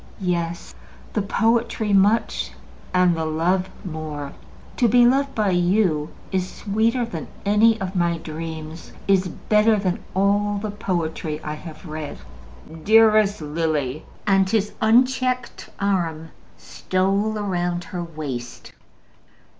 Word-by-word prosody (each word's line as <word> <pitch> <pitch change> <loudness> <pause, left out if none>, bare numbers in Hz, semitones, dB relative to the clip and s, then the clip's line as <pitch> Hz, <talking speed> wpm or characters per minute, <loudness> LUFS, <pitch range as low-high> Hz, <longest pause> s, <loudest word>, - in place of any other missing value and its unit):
"Yes. 175 -2 -2 0.4
The 210 - +1
poetry 225 0 +1
much, 205 +4 +2 0.4
and 180 -1 +3
the 160 - -2
love 175 +4 0 0.2
more. 155 -4 -5 0.4
To 240 - +4
be 240 +2 +6
loved 275 +3 +2
by 210 -3 +1
you 175 -4 +2 0.2
is 185 -1 -1
sweeter 225 +4 0
even 235 - -6
than 165 -3 -5 0.2
any 220 +2 +4
of 190 -1 -4
my 170 -1 +1
dreams, 160 0 -7
is 190 -1 +3
better 210 +5 +2
than 185 -3 -2
all 205 +1 +2
the 205 +1 -3
poetry 165 -6 -3
I 150 - -3
have 155 +2 -10
read." 155 -2 -6 0.7
"Dearest 215 -3 +5
Lily," 150 -3 -1 0.2
and 195 -1 +3
his 210 -1 0
unchecked 255 +2 +2
arm 170 -5 -1 0.3
stole 195 +3 -1
round 175 -4 -2
her 175 0 -5
waist. 145 -7 -7
185 Hz, 120 wpm, -22 LUFS, 165-215 Hz, 0.7 s, be